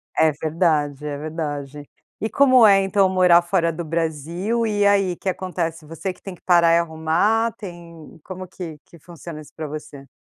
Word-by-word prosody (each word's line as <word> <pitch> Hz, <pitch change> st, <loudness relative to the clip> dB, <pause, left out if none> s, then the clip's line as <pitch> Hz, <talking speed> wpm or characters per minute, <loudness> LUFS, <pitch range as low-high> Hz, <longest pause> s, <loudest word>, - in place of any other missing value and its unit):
É 160 Hz, -1 st, +4 dB
verdade, 150 Hz, -2 st, -1 dB
é 145 Hz, -1 st, -4 dB
verdade. 145 Hz, -2 st, -5 dB, 0.3 s
E 220 Hz, -, -2 dB
como 255 Hz, -4 st, +5 dB
é, 195 Hz, -1 st, +6 dB
então, 195 Hz, 0 st, +2 dB
morar 180 Hz, -2 st, +5 dB
fora 170 Hz, -1 st, +1 dB
do 165 Hz, +1 st, -6 dB
Brasil? 170 Hz, +8 st, -2 dB
E 205 Hz, -1 st, +1 dB
aí, 195 Hz, -3 st, +3 dB
o -, -, -12 dB
que 190 Hz, -, -3 dB
acontece, 170 Hz, -4 st, -4 dB
você 165 Hz, +5 st, -5 dB
que -, -, -17 dB
tem 195 Hz, -, -8 dB
que 175 Hz, -, -17 dB
parar 170 Hz, -2 st, +4 dB
e 170 Hz, -, +4 dB
arrumar, 170 Hz, +8 st, +1 dB
tem 170 Hz, -5 st, -11 dB
como 185 Hz, 0 st, -8 dB
que 165 Hz, -5 st, -8 dB
que 170 Hz, -, -17 dB
funciona 170 Hz, -1 st, -10 dB
isso 150 Hz, -, -15 dB
pra 155 Hz, -1 st, -5 dB
você? 145 Hz, -2 st, -9 dB
170 Hz, 190 wpm, -22 LUFS, 155-190 Hz, 0.3 s, é